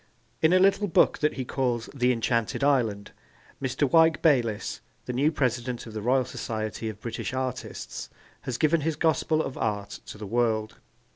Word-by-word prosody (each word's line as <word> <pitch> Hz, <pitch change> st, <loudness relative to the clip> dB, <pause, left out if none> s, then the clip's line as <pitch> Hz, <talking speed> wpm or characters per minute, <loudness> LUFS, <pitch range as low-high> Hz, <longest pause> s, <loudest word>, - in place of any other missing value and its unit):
In 160 Hz, -, +5 dB
a 185 Hz, -, +6 dB
little 195 Hz, +2 st, +3 dB
book 170 Hz, -, +3 dB
that 150 Hz, -, +1 dB
he 130 Hz, -, -3 dB
calls 120 Hz, -3 st, -1 dB
The 125 Hz, -2 st, +2 dB
Enchanted 115 Hz, +1 st, 0 dB
Island 115 Hz, -8 st, +1 dB, 0.5 s
Mr. 135 Hz, +2 st, 0 dB
Wyke 160 Hz, +3 st, +5 dB
Bayliss, 120 Hz, -9 st, +1 dB, 0.2 s
the 125 Hz, -, -4 dB
new 140 Hz, +5 st, +2 dB
President 125 Hz, -3 st, -1 dB
of 110 Hz, -, -10 dB
the 110 Hz, -, -4 dB
Royal 130 Hz, +3 st, +2 dB
Society 110 Hz, 0 st, -4 dB
of 105 Hz, -2 st, -8 dB
British 115 Hz, +2 st, -4 dB
Artists, 130 Hz, -1 st, -5 dB, 0.3 s
has 125 Hz, -2 st, -4 dB
given 155 Hz, +2 st, +3 dB
his 160 Hz, +1 st, -1 dB
gospel 160 Hz, 0 st, +1 dB
of 130 Hz, -, -6 dB
art 105 Hz, -3 st, -2 dB
to -, -, -8 dB
the 105 Hz, -, -7 dB
world. 110 Hz, -1 st, 0 dB
125 Hz, 170 wpm, -27 LUFS, 115-150 Hz, 0.5 s, a